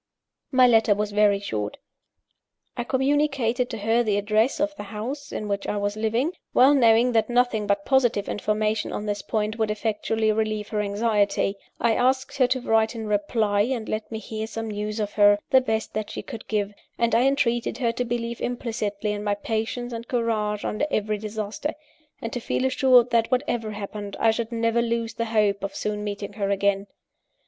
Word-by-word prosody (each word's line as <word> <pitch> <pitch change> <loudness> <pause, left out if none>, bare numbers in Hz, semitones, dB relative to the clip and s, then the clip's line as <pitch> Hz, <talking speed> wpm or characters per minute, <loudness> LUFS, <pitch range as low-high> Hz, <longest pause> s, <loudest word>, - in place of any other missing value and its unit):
My 255 -2 +6
letter 225 -3 +5
was 210 0 -2
very 205 -1 +3
short. 105 - -4 1.0
I 240 - -2
communicated 265 -2 +1
to 225 - -5
her 225 +3 +2
the 210 -4 +1
address 215 +6 +1
of 300 0 0
the - - -7
house 225 +8 -6
in 215 - -4
which 200 -1 -2
I 210 - -1
was 205 0 -1
living 225 +8 0 0.2
(well 265 +3 +7
knowing 235 -2 +5
that 225 0 +2
nothing 240 -4 +1
but 200 0 0
positive 245 -6 +2
information 215 +1 -1
on 210 - -4
this 205 -1 -2
point 215 +1 -2
would 220 -1 +1
effectually 220 +1 0
relieve 215 -1 -1
her 210 -1 -1
anxiety) 205 -1 +1 0.2
I 235 -1 +3
asked 260 +4 +1
her 255 - +5
to 255 0 0
write 225 0 +2
in 225 -1 -5
reply, 205 0 +1
and 230 0 -1
let 215 +1 -4
me 220 - -3
hear 220 0 -5
some 225 0 -5
news 210 +1 -3
of 205 -1 -2
her, 205 -1 +6
the 260 - +6
best 220 -3 -2
that 215 -1 -3
she - - -6
could 225 - -9
give 205 -1 -1 0.2
and 235 0 +1
I 245 +3 +4
entreated 240 -4 +1
her 240 -3 +1
to 240 +2 -2
believe 235 -1 -3
implicitly 220 -4 -2
in 205 0 -4
my 205 -1 0
patience 225 +3 -3
and 230 +1 -6
courage 215 -4 -1
under 220 +8 -1
every 215 -4 -1
disaster; 215 +6 -4 0.5
and 230 - -4
to 245 - -2
feel 255 - -1
assured 255 -2 +4
that, 230 -1 +2
whatever 240 -4 0
happened, 205 -1 -6
I 225 - +4
should 230 +1 -3
never 230 0 +1
lose 230 -1 -1
the 230 - -2
hope 210 -3 +1
of 200 - -4
soon 210 0 -3
meeting 205 -1 -5
her 200 -1 -2
again. 200 0 +1
220 Hz, 190 wpm, -25 LUFS, 210-240 Hz, 1.0 s, well